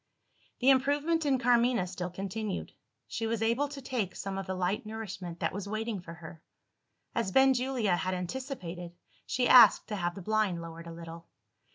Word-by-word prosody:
The 265 Hz, +2 st, +6 dB
improvement 290 Hz, +4 st, +2 dB
in 270 Hz, -2 st, +3 dB
Carmina 240 Hz, -3 st, +3 dB
still 180 Hz, 0 st, -5 dB
continued: 195 Hz, +3 st, -4 dB, 0.4 s
she 225 Hz, -, -3 dB
was 225 Hz, 0 st, -1 dB
able 235 Hz, +6 st, +2 dB
to 280 Hz, -1 st, -9 dB
take 235 Hz, -8 st, -2 dB
some 195 Hz, -1 st, -4 dB
of 195 Hz, -, -6 dB
the 190 Hz, -, -2 dB
light 185 Hz, +2 st, -1 dB
nourishment 215 Hz, -6 st, -6 dB
that -, -, 0 dB
was 200 Hz, +1 st, -5 dB
waiting 215 Hz, -1 st, -2 dB
for 165 Hz, -1 st, -9 dB
her. 165 Hz, -1 st, -11 dB, 0.7 s
As 230 Hz, -5 st, -1 dB
Benjulia 255 Hz, -6 st, +3 dB
had 185 Hz, 0 st, -1 dB
anticipated, 180 Hz, -, -5 dB, 0.3 s
she 250 Hz, -1 st, +1 dB
asked 250 Hz, -, +8 dB
to 210 Hz, -, -2 dB
have 175 Hz, -3 st, -2 dB
the 195 Hz, -, -8 dB
blind 215 Hz, -4 st, +1 dB
lowered 165 Hz, 0 st, -8 dB
a -, -, -7 dB
little. 165 Hz, 0 st, -9 dB
210 Hz, 175 wpm, -30 LUFS, 180-245 Hz, 0.7 s, asked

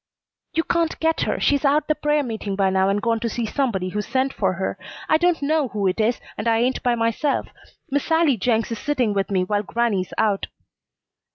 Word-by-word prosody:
"You 325 Hz, -, +2 dB
can't 335 Hz, -1 st, 0 dB
get 325 Hz, 0 st, +1 dB
her. -, -, -1 dB
She's 285 Hz, 0 st, +2 dB
out 295 Hz, +1 st, +2 dB
the 305 Hz, -, +3 dB
prayer 300 Hz, -1 st, +1 dB
meeting 220 Hz, -5 st, -4 dB
by 195 Hz, -1 st, +2 dB
now 190 Hz, 0 st, +2 dB
and 205 Hz, +2 st, 0 dB
gone 230 Hz, 0 st, +1 dB
to 230 Hz, +1 st, -2 dB
see 235 Hz, 0 st, -2 dB
somebody 215 Hz, -7 st, -1 dB
who 210 Hz, +3 st, -2 dB
sent 265 Hz, +5 st, -1 dB
for 190 Hz, -2 st, 0 dB
her. 190 Hz, +1 st, -3 dB, 0.3 s
I 315 Hz, -, +4 dB
don't 345 Hz, -3 st, +2 dB
know 305 Hz, -1 st, +2 dB
who 210 Hz, -4 st, -3 dB
it 185 Hz, +3 st, 0 dB
is, 225 Hz, +3 st, +1 dB, 0.2 s
and -, -, -2 dB
I 225 Hz, -1 st, +3 dB
ain't 250 Hz, +3 st, +1 dB
by 245 Hz, -1 st, +2 dB
myself. 230 Hz, +5 st, 0 dB, 0.4 s
Miss 285 Hz, 0 st, 0 dB
Sallie 320 Hz, -4 st, +3 dB
Jenks 225 Hz, +2 st, 0 dB
is 230 Hz, -, -3 dB
sitting 255 Hz, -8 st, 0 dB
with 195 Hz, -1 st, -1 dB
me 190 Hz, -2 st, +1 dB
while 205 Hz, +2 st, 0 dB
grannie's 210 Hz, -3 st, -1 dB
out." 205 Hz, -3 st, +1 dB
235 Hz, 215 wpm, -22 LUFS, 205-285 Hz, 0.4 s, I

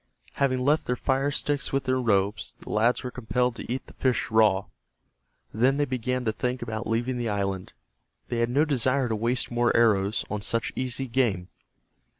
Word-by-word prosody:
Having 130 Hz, -2 st, +1 dB
left 150 Hz, +2 st, +2 dB
their 125 Hz, -, +1 dB
fire 135 Hz, +3 st, 0 dB
sticks 145 Hz, -1 st, -1 dB
with 135 Hz, 0 st, 0 dB
their 130 Hz, 0 st, +1 dB
robes, 100 Hz, -3 st, 0 dB
the -, -, -9 dB
lads 115 Hz, +3 st, +2 dB
were 125 Hz, -, -4 dB
compelled 125 Hz, 0 st, -1 dB
to -, -, -6 dB
eat 130 Hz, -, -3 dB
the -, -, -15 dB
fish 130 Hz, -3 st, 0 dB
raw. 105 Hz, -3 st, +4 dB, 0.9 s
Then 130 Hz, +5 st, +3 dB
they 145 Hz, -, +2 dB
began 125 Hz, -1 st, -2 dB
to 110 Hz, -, +2 dB
think 125 Hz, +2 st, -2 dB
about 110 Hz, 0 st, -4 dB
leaving 120 Hz, +3 st, 0 dB
the 120 Hz, -2 st, -1 dB
island. 100 Hz, -2 st, -2 dB, 0.5 s
They 120 Hz, -, -2 dB
had 115 Hz, 0 st, +1 dB
no 145 Hz, +5 st, +3 dB
desire 130 Hz, -2 st, +1 dB
to 110 Hz, -, 0 dB
waste 115 Hz, +4 st, -1 dB
more 120 Hz, 0 st, +2 dB
arrows 105 Hz, -3 st, +2 dB
on 105 Hz, -1 st, -3 dB
such 115 Hz, +2 st, -1 dB
easy 130 Hz, +1 st, -3 dB
game. 115 Hz, -8 st, 0 dB
120 Hz, 185 wpm, -26 LUFS, 110-130 Hz, 0.9 s, raw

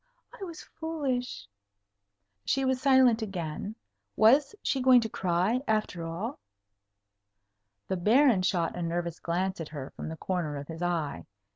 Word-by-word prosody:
I 480 Hz, -5 st, -9 dB
was 335 Hz, -4 st, -7 dB
foolish." 265 Hz, -, -3 dB, 1.0 s
She 270 Hz, 0 st, +1 dB
was 260 Hz, -1 st, +1 dB
silent 260 Hz, -4 st, +5 dB
again. 195 Hz, 0 st, -4 dB, 0.4 s
Was 275 Hz, -, +5 dB
she 270 Hz, -, 0 dB
going 255 Hz, -1 st, +7 dB
to 225 Hz, -, -3 dB
cry, 190 Hz, +6 st, 0 dB
after 215 Hz, -6 st, 0 dB
all? 180 Hz, -, -4 dB, 1.5 s
The 190 Hz, -, -1 dB
Baron 225 Hz, +3 st, +4 dB
shot 175 Hz, -3 st, 0 dB
a 175 Hz, -, -4 dB
nervous 170 Hz, 0 st, -2 dB
glance 180 Hz, +1 st, -2 dB
at 160 Hz, -, -6 dB
her 145 Hz, -4 st, -7 dB
from -, -, -7 dB
the 160 Hz, -, -6 dB
corner 175 Hz, -5 st, -2 dB
of 140 Hz, +2 st, -8 dB
his 165 Hz, +1 st, -7 dB
eye. 170 Hz, -5 st, -2 dB
195 Hz, 145 wpm, -29 LUFS, 170-255 Hz, 1.5 s, going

